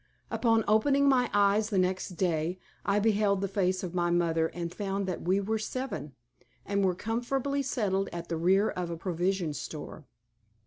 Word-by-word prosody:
Upon 225 Hz, -2 st, +2 dB
opening 275 Hz, +7 st, +4 dB
my 260 Hz, -2 st, +4 dB
eyes 205 Hz, +1 st, +3 dB
the 205 Hz, -, 0 dB
next 185 Hz, -1 st, 0 dB
day, 170 Hz, -1 st, 0 dB, 0.3 s
I 200 Hz, 0 st, +1 dB
beheld 205 Hz, -2 st, +2 dB
the 195 Hz, -, -1 dB
face 190 Hz, -1 st, 0 dB
of 180 Hz, -2 st, -4 dB
my 175 Hz, -1 st, +1 dB
mother 165 Hz, -2 st, +2 dB
and 170 Hz, 0 st, -5 dB
found 200 Hz, -1 st, -2 dB
that 185 Hz, -2 st, -3 dB
we 185 Hz, +3 st, +2 dB
were 220 Hz, +2 st, -1 dB
seven, 220 Hz, -, -4 dB, 0.5 s
and 200 Hz, 0 st, 0 dB
were 185 Hz, -2 st, +2 dB
comfortably 245 Hz, +7 st, -1 dB
settled 205 Hz, -7 st, 0 dB
at 170 Hz, 0 st, -6 dB
the 165 Hz, -, -2 dB
rear 190 Hz, +6 st, +3 dB
of 180 Hz, -1 st, -4 dB
a 170 Hz, -, -4 dB
provision 175 Hz, -1 st, -1 dB
store. 150 Hz, -1 st, -7 dB
195 Hz, 175 wpm, -29 LUFS, 175-215 Hz, 0.5 s, opening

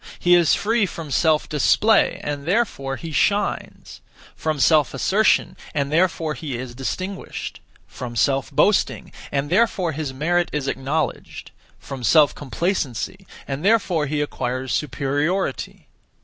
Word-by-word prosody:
He 175 Hz, -, +3 dB
is 170 Hz, -3 st, +5 dB
free 220 Hz, 0 st, +1 dB
from 165 Hz, -4 st, -8 dB
self 155 Hz, +1 st, +2 dB
display, 210 Hz, +8 st, +3 dB
and 145 Hz, 0 st, -4 dB
therefore 175 Hz, -10 st, 0 dB
he 160 Hz, +5 st, -7 dB
shines; 205 Hz, +7 st, -1 dB, 0.3 s
from 155 Hz, -2 st, -2 dB
self 150 Hz, -1 st, +3 dB
assertion, 200 Hz, +10 st, +2 dB, 0.2 s
and 140 Hz, -1 st, -1 dB
therefore 165 Hz, -1 st, +1 dB
he 145 Hz, -6 st, -5 dB
is 125 Hz, -1 st, -7 dB
distinguished; 185 Hz, +9 st, -5 dB, 0.3 s
from 120 Hz, -2 st, -8 dB
self 135 Hz, +2 st, +1 dB
boasting, 205 Hz, -1 st, +1 dB, 0.2 s
and 140 Hz, +2 st, -2 dB
therefore 190 Hz, -4 st, +2 dB
his 150 Hz, -2 st, -4 dB
merit 170 Hz, +6 st, 0 dB
is 145 Hz, -2 st, -2 dB
acknowledged; 140 Hz, +4 st, -3 dB, 0.3 s
from 135 Hz, -2 st, -8 dB
self 150 Hz, +3 st, +5 dB
complacency, 165 Hz, -, -3 dB, 0.2 s
and 140 Hz, +2 st, -4 dB
therefore 190 Hz, -7 st, +2 dB
he 150 Hz, +1 st, -1 dB
acquires 130 Hz, -3 st, -3 dB
superiority. 145 Hz, +6 st, -2 dB
155 Hz, 130 wpm, -22 LUFS, 135-180 Hz, 0.3 s, is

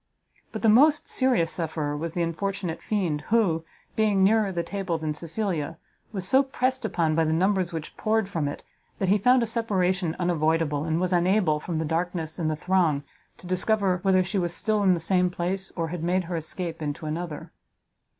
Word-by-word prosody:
But 220 Hz, -, -6 dB
the -, -, +4 dB
most 290 Hz, +8 st, +5 dB
serious 245 Hz, -11 st, +2 dB
sufferer 155 Hz, -3 st, -2 dB
was 165 Hz, +3 st, -4 dB
the 175 Hz, -, +1 dB
unfortunate 175 Hz, 0 st, -3 dB
fiend, 175 Hz, -9 st, -1 dB
who, 195 Hz, -8 st, +2 dB, 0.3 s
being 210 Hz, -3 st, +2 dB
nearer 210 Hz, 0 st, +3 dB
the 170 Hz, -2 st, -2 dB
table 195 Hz, -4 st, -3 dB
than 155 Hz, -1 st, -3 dB
Cecilia, 165 Hz, -1 st, -2 dB, 0.3 s
was 190 Hz, -4 st, -2 dB
so 265 Hz, +1 st, +5 dB
pressed 260 Hz, -1 st, -1 dB
upon 170 Hz, -7 st, 0 dB
by 165 Hz, +1 st, +2 dB
the 155 Hz, -, 0 dB
numbers 185 Hz, +2 st, +1 dB
which 160 Hz, -2 st, -6 dB
poured 220 Hz, -1 st, +1 dB
from 165 Hz, -7 st, -2 dB
it, 145 Hz, -, -6 dB, 0.3 s
that 190 Hz, -, -1 dB
he 205 Hz, +2 st, +4 dB
found 250 Hz, +4 st, +4 dB
a -, -, +1 dB
separation 190 Hz, -6 st, 0 dB
unavoidable, 160 Hz, -3 st, 0 dB
and 160 Hz, 0 st, 0 dB
was 185 Hz, 0 st, 0 dB
unable, 175 Hz, -3 st, +2 dB
from 170 Hz, +2 st, -5 dB
the 160 Hz, 0 st, -1 dB
darkness 165 Hz, 0 st, -2 dB
and 160 Hz, -2 st, 0 dB
the 155 Hz, -, 0 dB
throng, 165 Hz, -4 st, +1 dB, 0.3 s
to -, -, -15 dB
discover 185 Hz, 0 st, +1 dB
whether 185 Hz, -1 st, +3 dB
she 190 Hz, +2 st, -2 dB
was 175 Hz, -1 st, 0 dB
still 215 Hz, -1 st, +1 dB
in 190 Hz, -2 st, +4 dB
the -, -, -3 dB
same 180 Hz, +2 st, +2 dB
place, 180 Hz, +2 st, -2 dB
or 165 Hz, -2 st, -2 dB
had 170 Hz, -1 st, -5 dB
made 180 Hz, +2 st, +1 dB
her 175 Hz, 0 st, -5 dB
escape 165 Hz, +1 st, -4 dB
into 150 Hz, +1 st, -4 dB
another. 155 Hz, 0 st, -5 dB
180 Hz, 195 wpm, -26 LUFS, 160-200 Hz, 0.3 s, most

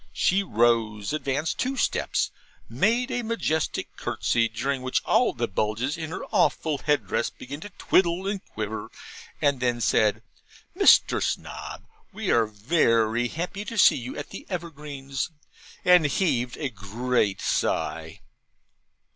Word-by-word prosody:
She 190 Hz, +2 st, +2 dB
rose, 115 Hz, -, +1 dB
advanced 150 Hz, +1 st, -1 dB
two 265 Hz, +1 st, -1 dB
steps, -, -, 0 dB, 0.4 s
made 245 Hz, +4 st, +1 dB
a 245 Hz, -1 st, -1 dB
majestic 220 Hz, -9 st, -2 dB
curtsey, 115 Hz, -1 st, 0 dB
during 135 Hz, +5 st, -2 dB
which 130 Hz, 0 st, -1 dB
all 235 Hz, +3 st, +3 dB
the 120 Hz, -, -2 dB
bugles 110 Hz, -, -1 dB
in 160 Hz, -2 st, -5 dB
her -, -, -5 dB
awful 155 Hz, -3 st, +1 dB
head 150 Hz, -1 st, +1 dB
dress -, -, -1 dB
began 140 Hz, +3 st, -9 dB
to 205 Hz, -, -8 dB
twiddle 180 Hz, 0 st, +2 dB
and 200 Hz, -1 st, -2 dB
quiver 110 Hz, 0 st, -5 dB, 0.5 s
and 140 Hz, -2 st, +3 dB
then 120 Hz, -1 st, 0 dB
said, 105 Hz, -1 st, +2 dB, 0.5 s
'Mr. -, -, +5 dB
Snob, -, -, -4 dB, 0.3 s
we -, -, -2 dB
are 115 Hz, -2 st, +4 dB
very 115 Hz, 0 st, +2 dB
happy 180 Hz, +8 st, -4 dB
to 230 Hz, -, -6 dB
see -, -, +7 dB
you 125 Hz, +1 st, -6 dB
at 145 Hz, -, -7 dB
the -, -, -9 dB
Evergreens,' 150 Hz, -6 st, -5 dB, 0.6 s
and 180 Hz, -4 st, +6 dB
heaved 125 Hz, -7 st, 0 dB
a 145 Hz, -, -2 dB
great 110 Hz, 0 st, -1 dB
sigh. -, -, -1 dB
140 Hz, 140 wpm, -26 LUFS, 115-170 Hz, 0.6 s, see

